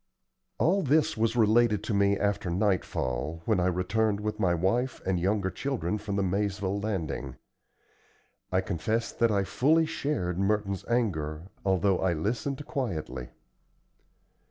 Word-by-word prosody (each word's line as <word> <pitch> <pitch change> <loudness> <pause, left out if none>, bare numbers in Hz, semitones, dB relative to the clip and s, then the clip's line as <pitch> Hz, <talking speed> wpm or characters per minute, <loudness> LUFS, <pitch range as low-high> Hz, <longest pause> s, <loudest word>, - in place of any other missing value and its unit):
All 195 +4 +3
this 150 0 +2
was 115 +1 +1
related 110 -2 +4
to 110 - -2
me 100 0 +3
after 100 -3 0
nightfall, 80 - -1
when 110 -4 +2
I 90 - +2
returned 100 +4 +1
with 105 +1 -3
my 90 -4 +2
wife 115 +10 0
and 95 -2 +1
younger 95 +1 0
children 110 -8 -2
from 100 -1 -4
the 100 - +1
Maizeville 100 +1 -1
Landing. 80 - -3 1.2
I 95 +1 +2
confess 110 +6 -1
that 115 - +2
I 100 -2 +2
fully 155 +11 +3
shared 140 - -2
Merton's 100 -1 0
anger, 90 -8 -1
although 95 0 +2
I 95 -2 +1
listened 120 - -2
quietly. 75 - -4
100 Hz, 135 wpm, -28 LUFS, 90-115 Hz, 1.2 s, related